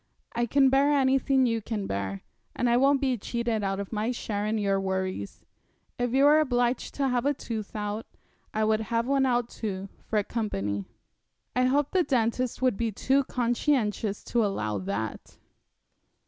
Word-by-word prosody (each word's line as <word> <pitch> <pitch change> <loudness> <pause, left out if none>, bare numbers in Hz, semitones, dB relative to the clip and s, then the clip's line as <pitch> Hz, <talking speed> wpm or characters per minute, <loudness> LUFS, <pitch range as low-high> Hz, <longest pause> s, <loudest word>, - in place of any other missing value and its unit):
'I 240 0 +1
can 270 +2 +4
bear 275 +2 +4
anything 270 -1 +3
you 230 -2 0
can 210 -2 -3
bear, 100 - -3 0.3
and 245 - 0
I 235 - +4
won't 275 +2 +4
be 260 -4 +1
cheated 235 0 -2
out 195 0 -1
of 200 +2 -5
my 215 +2 0
share 210 -4 -2
in 220 +1 0
your 200 -2 +1
worries. 190 - -3 0.6
If 245 -1 0
you 270 +2 +3
were 295 +2 +7
obliged 245 -4 0
to 275 -1 +1
have 245 -1 +1
a 290 - +2
tooth 220 -5 -6
out, 210 +1 -3 0.4
I 215 - 0
would 215 0 +2
have 230 +1 -1
one 270 0 +2
out 245 -1 +1
too, 200 -4 -5 0.2
for 210 -2 +1
company.' 100 - -3 0.7
'I 250 0 +3
hope 275 +2 +2
the 375 - +3
dentist 250 -3 0
would 250 -6 +2
be 230 -1 0
too 270 +6 +1
conscientious 235 -4 0
to 235 -2 +1
allow 110 - -1
that.' 100 +3 -5
230 Hz, 175 wpm, -27 LUFS, 205-260 Hz, 0.7 s, were